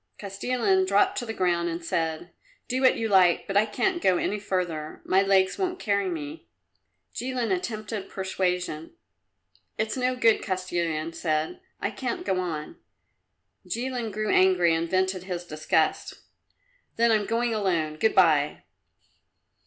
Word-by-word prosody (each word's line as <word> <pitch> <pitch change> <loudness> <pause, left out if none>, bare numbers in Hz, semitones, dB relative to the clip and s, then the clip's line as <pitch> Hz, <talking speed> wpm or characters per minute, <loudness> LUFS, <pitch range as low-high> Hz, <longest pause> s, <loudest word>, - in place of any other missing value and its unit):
Kostilin 200 -1 0
dropped 200 +1 +3
to 240 - -6
the - - -2
ground 175 -3 +1
and 165 0 -5
said, 165 +1 -2 0.4
"Do 255 +1 -1
what 260 - +5
you 225 - -1
like, 185 -4 +4
but 195 - -5
I 210 +2 +4
can't 345 - 0
go 185 -2 +3
any 210 - -1
further. 175 -6 -3
My 190 +1 +3
legs 190 -1 +2
won't 370 -1 -1
carry 200 - 0
me." 155 -2 -6 0.7
Jilin 245 -3 -2
attempted 215 +1 -5
persuasion. 180 -4 -2 0.8
"It's 220 0 -1
no 255 0 0
good," 230 -3 +3
Kostilin 170 -4 -2
said; 155 - -1 0.2
"I - - -2
can't 250 -3 -4
go 190 -2 0
on." 160 -4 -4 0.9
Jilin 245 -2 -3
grew 215 +1 -2
angry 180 -3 +4
and 165 +1 -1
vented 185 0 0
his 180 -2 -4
disgust. 155 0 0 0.8
"Then 235 0 +3
I'm 215 -2 +2
going 230 +1 0
alone 170 -7 0
good 220 +6 +2
bye." 155 -6 +3
190 Hz, 145 wpm, -26 LUFS, 170-220 Hz, 0.9 s, what